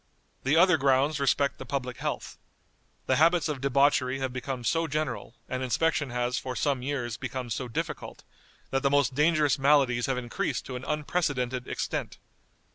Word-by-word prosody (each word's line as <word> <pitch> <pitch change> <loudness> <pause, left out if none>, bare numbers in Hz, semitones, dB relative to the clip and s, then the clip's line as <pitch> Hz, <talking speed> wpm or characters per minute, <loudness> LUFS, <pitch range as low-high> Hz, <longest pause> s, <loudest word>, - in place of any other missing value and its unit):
The 135 +4 +2
other 180 0 +6
grounds 140 +2 +2
respect 140 0 +1
the - - -5
public 125 -2 -3
health. - - -4 0.7
The 130 - +2
habits 165 +1 +4
of 145 -4 -3
debauchery 140 -1 +3
have 130 -2 -3
become 125 0 -4
so 165 +7 +1
general, 150 -5 -3
and 130 0 -3
inspection 145 +3 +1
has, 125 +1 -1
for 130 -1 -5
some 135 +1 0
years, 125 -4 -3
become 130 -2 -5
so 125 +3 -2
difficult, 115 - -5 0.5
that 135 - +1
the 140 - +2
most 140 -2 +2
dangerous 150 -1 +3
maladies 135 -3 +3
have 130 -1 0
increased 120 -1 -2
to 130 - -6
an 125 - -6
unprecedented 145 -5 -1
extent. - - -3
135 Hz, 165 wpm, -28 LUFS, 125-150 Hz, 0.7 s, other